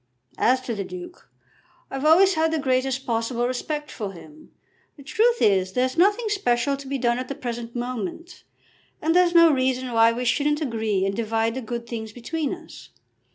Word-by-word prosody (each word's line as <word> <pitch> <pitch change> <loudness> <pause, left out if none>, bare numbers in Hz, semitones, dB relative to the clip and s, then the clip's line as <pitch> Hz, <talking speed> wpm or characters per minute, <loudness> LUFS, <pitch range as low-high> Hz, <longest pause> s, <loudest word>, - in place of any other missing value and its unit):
As 255 +2 +3
to 255 -2 -4
the 200 -2 -3
Duke, 355 - -10 0.6
I've 270 +2 -3
always 370 +5 +6
had 320 -1 +1
the 320 - 0
greatest 265 -1 0
possible 235 +1 -1
respect 295 +4 -4
for 205 -4 -5
him. 305 - -15 0.5
The 280 - -12
truth 465 - +2
is, 190 -2 +2
there's 255 +1 0
nothing 410 +7 +3
special 275 -9 +1
to 275 0 -10
be 275 +1 -2
done 240 -1 +1
at 255 - -5
the 275 - -5
present 240 -3 -6
moment, 245 - -5 0.6
and 325 +2 0
there's 355 -1 +4
no 335 -1 +8
reason 255 -1 0
why 225 0 +5
we 245 +2 -3
shouldn't 295 +4 +1
agree 220 -8 -1
and 195 0 -1
divide 225 0 0
the 260 - -4
good 235 0 -5
things 220 -2 -6
between 290 +6 -3
us. 340 -3 -10
255 Hz, 185 wpm, -24 LUFS, 230-310 Hz, 0.6 s, no